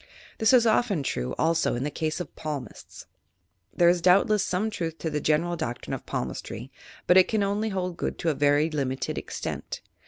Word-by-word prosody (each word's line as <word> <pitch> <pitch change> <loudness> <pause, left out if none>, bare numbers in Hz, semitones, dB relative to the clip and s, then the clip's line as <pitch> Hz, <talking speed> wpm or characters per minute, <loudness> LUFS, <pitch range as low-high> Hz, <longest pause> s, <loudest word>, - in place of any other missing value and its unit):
This 220 -1 +4
is 250 -3 +6
often 215 - +2
true, 60 - -2
also, 165 -3 +1
in 120 - -2
the 150 - -2
case 155 +3 -2
of 180 - -7
palmists. 145 -7 -7 0.7
There 175 - +3
is 175 0 +4
doubtless 195 +3 +4
some 205 +5 -1
truth 165 -6 -5
in 160 - -1
the 150 - -1
genera! 165 +4 +1
doctrine 120 -8 -4
of - - -6
palmistry, 65 - -5 0.3
but 180 - +5
it 185 - +7
can 215 -2 +1
only 205 +2 0
hold 185 -3 -3
good - - -3
to 165 - 0
a - - -1
very 145 +2 +2
limited 135 -3 -2
extent. - - -6
165 Hz, 190 wpm, -26 LUFS, 150-195 Hz, 0.7 s, it